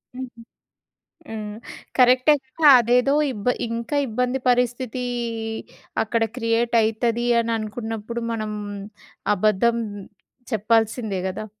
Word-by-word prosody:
హుహు. 250 Hz, -2 st, -8 dB, 0.9 s
హ్మ్. 215 Hz, -1 st, -6 dB, 0.4 s
కరెక్టె 255 Hz, +3 st, +6 dB
కదా! 295 Hz, +3 st, +4 dB
అదేదో 245 Hz, +3 st, +3 dB, 0.2 s
ఇబ్బ 205 Hz, -3 st, -8 dB, 0.2 s
ఇంకా 230 Hz, +5 st, -3 dB
ఇబ్బంది 250 Hz, +3 st, -1 dB
పరిస్థితి 250 Hz, 0 st, 0 dB, 1.0 s
అక్కడ 225 Hz, +1 st, 0 dB
క్రియేటయితది 230 Hz, 0 st, +1 dB, 0.2 s
అననుకున్నప్పుడు 225 Hz, 0 st, -4 dB
మనం, 215 Hz, -2 st, -3 dB, 0.8 s
అబద్ధం 215 Hz, +3 st, +2 dB, 0.8 s
చెప్పాల్సిందే 220 Hz, -1 st, +1 dB
గదా! 190 Hz, -, -5 dB
230 Hz, 85 wpm, -23 LUFS, 220-245 Hz, 1.0 s, కరెక్టె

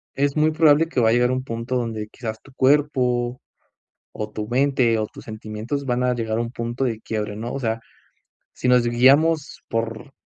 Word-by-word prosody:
es 140 Hz, +2 st, 0 dB
muy 155 Hz, +1 st, +4 dB
probable 155 Hz, 0 st, +4 dB
que 130 Hz, -, 0 dB
va 110 Hz, -, +4 dB
a -, -, +4 dB
llegar 125 Hz, +1 st, +3 dB
un 130 Hz, 0 st, -1 dB
punto 115 Hz, +1 st, -4 dB
donde 115 Hz, -3 st, -2 dB
quizás 110 Hz, -1 st, -7 dB
tu 135 Hz, -, -18 dB
cuerpo, 130 Hz, -3 st, +2 dB, 0.7 s
o 105 Hz, -, -4 dB
tu 105 Hz, 0 st, -5 dB
mente, 125 Hz, -3 st, +2 dB
o 110 Hz, -, -1 dB
tus -, -, -13 dB
sentimientos 110 Hz, +5 st, -5 dB
van 125 Hz, 0 st, 0 dB
a 125 Hz, 0 st, +2 dB
llegar 110 Hz, -2 st, -2 dB
a -, -, +1 dB
un 120 Hz, 0 st, -4 dB
punto 120 Hz, +1 st, -3 dB
de 115 Hz, -4 st, -1 dB
quiebre, 105 Hz, -2 st, -3 dB
¿no? 115 Hz, +3 st, -5 dB
O 140 Hz, -, -3 dB
sea, 115 Hz, -2 st, -1 dB, 0.7 s
si 125 Hz, -, -3 dB
nos 125 Hz, -1 st, +4 dB
guiamos 140 Hz, +6 st, +3 dB
por 115 Hz, +4 st, -3 dB
120 Hz, 200 wpm, -22 LUFS, 115-135 Hz, 0.7 s, muy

